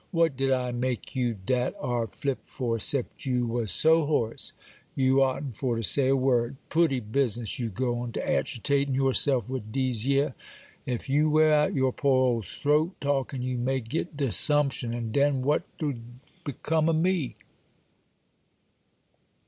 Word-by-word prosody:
'What 165 -5 +2
did 135 +1 0
I 125 -1 0
make 125 +1 -3
you 120 -3 0
dat 125 +6 -1
ar' 120 -2 -1
flip 135 +5 -3
for, 115 -3 -3
'cept 135 +3 -2
you 125 -1 +1
was 115 -2 -2
so 160 - +4
hoarse 115 -7 -1 0.4
you 135 0 +3
oughtn' 135 +1 0
for 120 +2 -2
to 115 - -3
say 135 +5 +4
a 135 - +4
word? 130 -1 +1
Pootty 160 -5 +2
business, 120 0 -2
you 120 -2 -2
go 120 +3 -2
to 115 - -5
agitatin' 140 +2 0
your 135 0 +2
self 130 -7 +2
wid 125 -5 -5
dese 125 -3 -1
yer! 140 0 +2 0.5
Ef 125 -3 -3
you 150 +3 +2
wear 155 0 +4
out 150 0 +2
your 130 -2 +1
poor 140 -2 +2
old 115 -6 0
throat 150 - 0
talkin', 135 -2 -1
you 130 -1 -2
may 130 +2 0
get 145 +6 -4
de 140 -3 0
'sumption; 140 -2 +2
and 115 -2 -4
den 140 -2 +2
what'd 145 +3 +1 0.8
become 155 +3 0
o' - - +2
me? 165 -3 0
130 Hz, 160 wpm, -27 LUFS, 120-145 Hz, 0.8 s, so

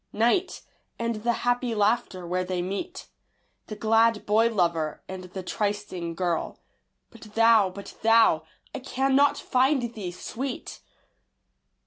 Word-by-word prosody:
Night; 240 - +1 0.3
and 230 -1 -2
the 235 +3 0
happy 245 -1 +1
laughter 210 -3 0
where 180 +1 -1
they 180 0 -3
meet, 265 - -5 0.6
The 215 - -6
glad 225 0 +2
boy 220 +3 +3
lover 170 -6 0
and 185 -1 -7
the 185 +1 -7
trysting 200 -4 -3
girl. 175 -2 -2 0.5
But 215 -3 -14
thou 225 -3 +5
but 200 +2 -10
thou 225 -8 +5 0.3
I - - -4
cannot 270 +2 +2
find 255 -2 +1
thee, 195 -6 -5
Sweet! 250 +8 -6
215 Hz, 125 wpm, -26 LUFS, 185-240 Hz, 0.6 s, thou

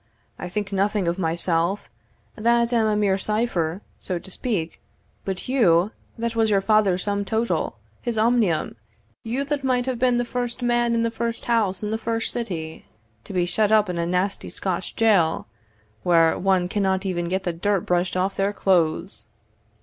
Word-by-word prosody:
I - - -5
think 205 +2 -3
nothing 195 -1 +1
of 170 +2 -1
myself, 170 +2 0 0.5
that 235 +2 +2
am 225 -2 +3
a 215 - +2
mere 200 -2 +2
cipher, 200 -5 -1 0.2
so 185 - -3
to 190 +2 -10
speak; 185 -8 -2 0.4
but 190 -1 -4
you, 205 -7 +3 0.3
that 230 0 -2
was 225 -1 +2
your 200 -2 +4
father's 195 -3 +2
sum 200 -1 0
total 225 +3 -1 0.2
his 235 -3 -2
omnium, 220 - +2 0.5
you 245 +5 -2
that 285 0 -2
might 250 -2 +1
have 255 -2 -2
been 250 -1 +3
the 245 - 0
first 245 0 -3
man 240 -1 +2
in 230 - +1
the 230 - 0
first 230 0 -3
house 215 -5 +1
in 210 - -2
the 220 - -1
first 225 0 -1
city, 170 -9 -5 0.4
to - - -9
be 180 -2 +1
shut 210 +4 +1
up 210 -3 +4
in 170 - -3
a 170 - 0
nasty 180 +3 -1
Scotch 185 -1 -3
jail, 200 -8 +3 0.6
where 165 -2 +4
one 190 -2 +1
cannot 190 0 0
even 175 -2 -1
get 190 +1 -1
the 175 - -1
dirt 195 +3 0
brushed 175 +1 0
off 190 +2 0
their 195 +1 0
clothes!" 175 -6 0
200 Hz, 180 wpm, -23 LUFS, 180-230 Hz, 0.6 s, your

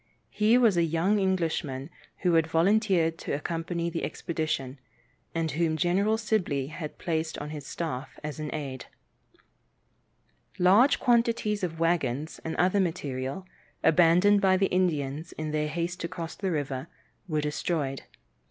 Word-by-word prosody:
He 215 +3 +4
was 225 -7 +4
a 170 - +4
young 165 +6 +1
Englishman 165 -7 -1 0.3
who 180 -2 +2
had 165 -1 +4
volunteered 170 -1 +2
to - - -4
accompany 165 +3 -2
the 165 0 -3
expedition, 150 -5 -3 0.6
and 165 -1 0
whom 160 0 0
General 195 +6 +2
Sibley 180 - -1
had 155 -1 -6
placed 160 -2 -2
upon 150 +1 -6
his 150 -2 -7
staff 150 -5 -5
as 150 +1 -5
an 155 -1 -3
aide. 135 -4 -5 1.7
Large 200 +10 +5
quantities 230 -4 +2
of 165 -2 -3
wagons 160 -3 0
and 160 - -3
other 185 +3 +2
material, 145 -3 -2 0.4
abandoned 180 +5 +5
by 190 -2 +4
the 195 +1 +1
Indians 160 -4 0
in 155 -1 -4
their 150 0 0
haste 170 +3 -3
to 170 - -2
cross 170 -2 -6
the 195 - -3
river, 140 -5 -2 0.4
were 155 -3 0
destroyed. 150 -2 -2
165 Hz, 145 wpm, -28 LUFS, 150-185 Hz, 1.7 s, Large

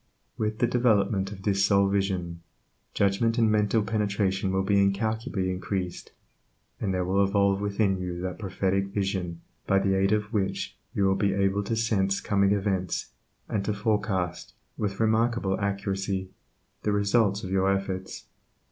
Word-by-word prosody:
With 110 0 -2
the 120 - +3
development 105 -5 +2
of 95 -2 -9
this 100 -1 +2
soul 100 0 +4
vision, 95 -4 -1 0.5
judgment 100 +4 +2
and 115 -2 +4
mental 105 +1 +2
penetration 100 -3 0
will 95 0 +1
be 100 0 +3
incalculably 100 -1 0
increased, 90 0 -4 0.7
and 100 - -1
there 90 -1 0
will 95 +2 +2
evolve 100 0 +2
within 100 -1 +1
you 90 -1 -4
that 90 -1 -4
prophetic 95 -1 0
vision 95 -4 -3 0.3
by 95 - +4
the 95 0 +2
aid 95 +1 +2
of 105 +1 0
which 100 -3 -1 0.2
you 100 - +1
will 95 0 +4
be 100 0 +1
able 100 +1 +1
to 115 - -1
sense 100 -4 +1
coming 100 -1 +2
events, 95 -3 -1 0.4
and 100 - -1
to 105 - 0
forecast, 105 -4 -1 0.2
with 100 -2 -3
remarkable 110 -3 +1
accuracy, 100 -1 -2 0.5
the 105 - 0
result 100 0 +2
of 95 - -5
your 95 0 +2
efforts. 95 -1 -3
100 Hz, 155 wpm, -27 LUFS, 95-105 Hz, 0.7 s, soul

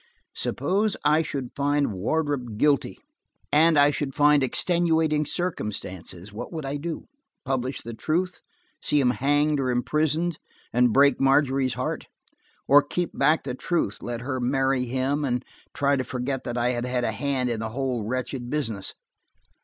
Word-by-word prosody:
Suppose 205 +2 0
I 150 +2 +5
should 140 -5 -4
find 145 -3 +1
Wardrop 125 +2 -1
guilty, 145 +3 +2 0.5
and 160 +1 +5
I 145 0 +6
should 140 -2 -3
find 150 0 +5
extenuating 160 +1 +1
circumstances–what 100 - -4
would 160 -4 -5
I 140 +2 -2
do? 160 +2 -5 0.4
Publish 130 0 -2
the 115 - -6
truth, 175 +10 -1 0.4
see 150 - +2
him 125 -3 +3
hanged 145 +3 +1
or 130 -2 0
imprisoned, 155 +6 0 0.3
and 125 0 +4
break 140 +2 +4
Margery's 135 -2 +3
heart? 125 - -3 0.6
Or 145 +1 +7
keep 170 +4 -3
back 150 +4 +3
the - - -4
truth, 130 - -1
let 120 -1 -4
her 130 +1 -3
marry 135 +1 +1
him, 130 +4 -1
and 125 -2 -1 0.3
try 140 +1 +1
to 130 - -1
forget 125 +2 -3
that 120 0 -3
I 120 +1 +2
had 120 0 -1
had 125 -1 -1
a 115 - +1
hand 130 0 -1
in 115 - -2
the 110 0 -3
whole 130 0 -2
wretched 125 +2 -3
business? 115 -10 -3
135 Hz, 155 wpm, -25 LUFS, 125-150 Hz, 0.6 s, Or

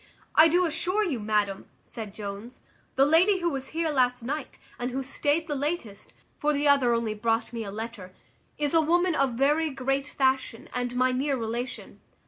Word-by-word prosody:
"I 315 +1 +8
do 355 +3 +3
assure 360 +6 0
you, 305 - -1
madam," 210 -2 -1 0.2
said 215 -3 -8
Jones, 210 +4 -7 0.3
"the 270 - +5
lady 345 +7 +4
who 345 -2 0
was 270 -2 -4
here 325 0 -1
last 250 -3 +1
night, 285 +4 -4 0.2
and 245 +1 -2
who 265 +2 -3
staid 290 +4 0
the 300 - -2
latest 275 - -4 0.3
(for 300 0 +1
the 290 +1 +1
other 280 -4 +4
only 230 -2 -1
brought 225 +2 -1
me 230 -1 -3
a 205 - -6
letter), 220 -3 -7 0.5
is 295 0 -1
a 325 - +5
woman 350 +3 +2
of 275 -5 +1
very 295 +6 +2
great 270 0 -1
fashion, 265 -5 -1
and 245 0 -2
my 255 +1 +3
near 270 +2 0
relation." 235 +2 -5
265 Hz, 185 wpm, -27 LUFS, 230-300 Hz, 0.5 s, I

